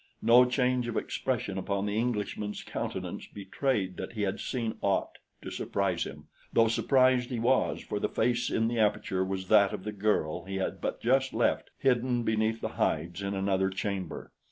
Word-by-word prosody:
No 120 +2 +7
change 125 -1 +1
of 120 - -2
expression 110 -7 -2
upon 100 +1 -1
the 105 0 -2
Englishman's 105 -2 -2
countenance - - -5
betrayed 100 -1 -2
that - - -6
he 105 -2 -2
had 95 - -1
seen 115 -4 -3
aught 100 -1 0 0.2
to - - -6
surprise - - -1
him, - - -9 0.3
though 115 -1 +4
surprised 130 +1 +3
he 125 - -2
was 125 +3 +2
for 105 - -4
the - - -1
face 120 +1 +1
in 115 - +1
the 115 0 -1
aperture 105 -3 +1
was 95 0 -3
that 105 -2 +5
of - - -5
the 105 - -3
girl 95 -5 0
he 95 0 -5
had 95 - -2
but - - -3
just 130 +2 +2
left - - +1
hidden 125 -2 +1
beneath 110 0 0
the - - -2
hides 85 +4 0
in 100 0 -2
another 95 0 +1
chamber. 95 -1 -4
110 Hz, 180 wpm, -29 LUFS, 95-120 Hz, 0.3 s, No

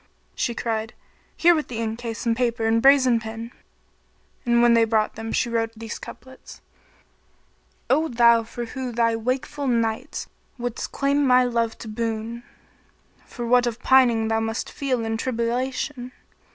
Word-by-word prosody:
She 235 - -2
cried, 225 -1 -3 0.4
"Here 345 +1 +6
with 310 -2 -1
the 240 - -6
ink 225 0 -3
case 230 -1 -5
and 230 -1 +2
paper 235 -2 0
and 225 +1 +2
brazen 260 -3 +5
pen;" 225 +1 -7 1.0
and 235 0 +4
when 240 -1 +6
they 230 -1 +5
brought 220 -1 +1
them 225 0 -6
she - - +1
wrote 225 -1 -1
these 225 -1 -6
couplets, 260 0 -12 1.3
"O 310 +5 +2
thou 235 -3 +5
who 235 +1 -6
for 255 +2 -5
thy 230 -1 +1
wakeful 255 +5 -2
nights 230 +2 -1 0.3
wouldst 245 -1 -4
claim 280 +1 +1
my 255 -2 +5
love 235 -2 -1
to - - -9
boon, 225 +1 -3 0.4
* - - -35
For 240 - -6
what 245 +1 +3
of 230 -2 -3
pining 240 -4 +4
thou 225 0 +1
must 225 0 -3
feel 255 -5 -2
and 225 0 -2
tribulation! 250 +2 -2
235 Hz, 160 wpm, -23 LUFS, 225-255 Hz, 1.3 s, Here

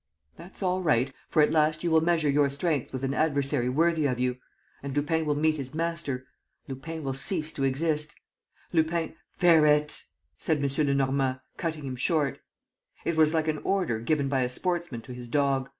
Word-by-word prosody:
"That's 180 +4 -10
all 185 0 +1
right, 135 -6 +2 0.2
for 155 - +4
at 150 - +2
last 155 0 +2
you 170 - 0
will 160 0 +5
measure 165 -2 +2
your 140 0 +3
strength 145 -1 -1
with 130 0 -5
an 135 0 0
adversary 140 -5 +1
worthy 160 +2 +2
of 125 -2 -2
you.... 125 0 0 0.4
And 140 0 -5
Lupin 155 +2 0
will 150 - +2
meet 155 +1 +2
his 135 0 -6
master.... 165 -6 -2 0.4
Lupin 150 +4 -6
will 135 -1 -2
cease 155 +3 -2
to 135 - -3
exist.... 150 +3 0 0.6
Lupin.. 165 0 +1
." - - -57
"Ferret!" 150 -3 +4 0.3
said 160 - +1
M. 140 +1 0
Lenormand, 135 -1 +1 0.2
cutting 160 -3 -3
him 130 -1 -4
short. 145 +1 0 0.7
It 170 - 0
was 160 0 +4
like 160 0 +1
an 155 -1 0
order 180 - 0
given 140 +4 0
by 135 -1 +1
a 125 - 0
sportsman 170 -3 -2
to 125 - -9
his 125 0 -8
dog. 135 0 +1
150 Hz, 185 wpm, -27 LUFS, 135-160 Hz, 0.7 s, will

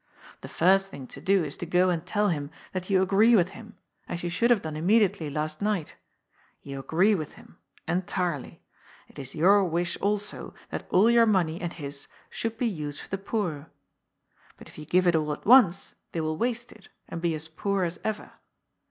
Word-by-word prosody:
The - - -8
flrst 195 +3 +3
thing 140 -8 -9
to - - -10
do 195 -2 +3
is 145 -2 -4
to - - -5
go 180 +2 +3
and 165 -2 -2
tell 205 +3 0
him 145 -4 -2 0.2
that 185 0 -4
you 190 -1 +4
agree 210 +5 +5
with 180 -3 +3
him, 215 +2 -13 0.3
as 175 - -4
you 175 - -2
should 235 +7 +1
have 235 -5 +3
done 155 -1 -5
immediately 190 -1 +2
last 155 +3 -3
night. 205 -6 -1 0.7
You 140 -1 -6
agree 175 +10 +2
with 155 -7 -3
him— - - -18 0.3
entirely. 180 -4 -2 0.5
It - - -13
is 135 -1 -8
your 195 +5 +5
wish, 175 0 -1
also, 205 0 -2 0.2
that - - -5
all 210 +6 +5
your 235 -1 +5
money 175 -5 +1
and 175 -1 -3
his 140 -3 -8 0.2
should 225 0 -4
be 245 - -1
used 150 -9 -3
for - - -12
the 195 - -3
poor. 180 -8 -3 0.9
But - - -13
if - - -13
you 150 - -8
give 180 +4 +2
it 175 -1 +4
all 155 -1 0
at - - -10
once, 210 -7 +5 0.2
they 165 - -1
will 155 0 -1
waste 240 +5 -2
it, 215 - -17 0.2
and 165 - -6
be 170 -2 0
as 155 +1 -6
poor 195 +4 -1
as 170 0 -3
ever. 220 -1 -4
180 Hz, 205 wpm, -27 LUFS, 160-205 Hz, 0.9 s, agree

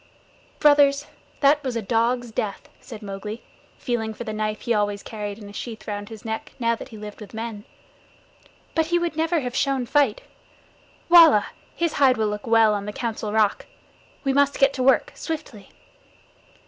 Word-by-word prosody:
"Brothers, 290 -1 +5 0.4
that 290 +1 +4
was 255 -3 -3
a 230 - -1
dog's 235 +3 0
death," 210 -2 -4
said 220 -2 -10
Mowgli, 205 +3 -6 0.3
feeling 225 -3 -2
for 240 - -6
the 215 -2 -5
knife 215 0 -2
he 235 - 0
always 205 -1 0
carried 205 -2 -6
in 210 -2 -11
a 205 - -11
sheath 225 0 -7
round 205 -1 -5
his 220 -1 -11
neck 220 0 -5
now 230 -1 +1
that 230 - -7
he 220 - -10
lived 210 +1 -9
with 210 +1 -10
men. 220 -2 -6 1.1
"But 320 -1 +1
he 345 +1 +2
would 345 -2 -2
never 325 0 +1
have 250 -1 -5
shown 275 -3 +1
fight. 275 -4 +2 1.5
His 335 -2 0
hide 265 -4 +4
will 215 -1 +1
look 210 +1 -5
well 225 -2 +5
on 205 0 -3
the - - -3
Council 220 -2 -3
Rock. 215 -1 +1 0.6
We 270 -1 +1
must 280 0 +3
get 275 0 +4
to 260 - -3
work 265 +1 +3
swiftly." 300 - -6
230 Hz, 175 wpm, -23 LUFS, 210-275 Hz, 1.5 s, Brothers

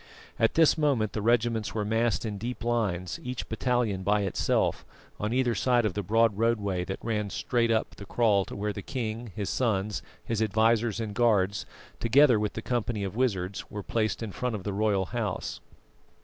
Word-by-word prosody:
At 115 -1 +2
this 160 -1 +5
moment 130 -8 +1
the 105 - -2
regiments 115 -1 +1
were 105 -2 -1
massed 115 +2 +1
in 105 -2 -4
deep 120 +3 -5
lines, 100 -7 -1
each 125 -1 -5
battalion 115 -4 0
by 105 +2 +2
itself, 100 -2 0 0.4
on 105 +1 -1
either 125 -1 +2
side 120 +3 +2
of 105 - 0
the 105 - -2
broad 110 +1 +2
roadway 105 -6 +1
that 95 - -4
ran 105 -3 -1
straight 115 +3 0
up 110 -1 +1
the 100 - -10
kraal 105 -4 +3
to - - -8
where 105 +1 -2
the 100 - -6
king, 115 -2 -4
his 100 -2 -2
sons, 105 -4 0 0.2
his 115 -1 -2
advisers 110 +1 +2
and 110 -2 -3
guards, 105 -2 +2 0.3
together 125 0 +5
with 105 -1 -1
the 115 - -5
company 120 -3 -1
of 95 0 -4
wizards, 100 -7 -1
were 105 -1 -6
placed 110 +2 -1
in 110 - -4
front 125 +3 -2
of 100 - -6
the 100 - -3
royal 100 -2 +1
house. 105 -3 -3
110 Hz, 190 wpm, -28 LUFS, 100-120 Hz, 0.4 s, this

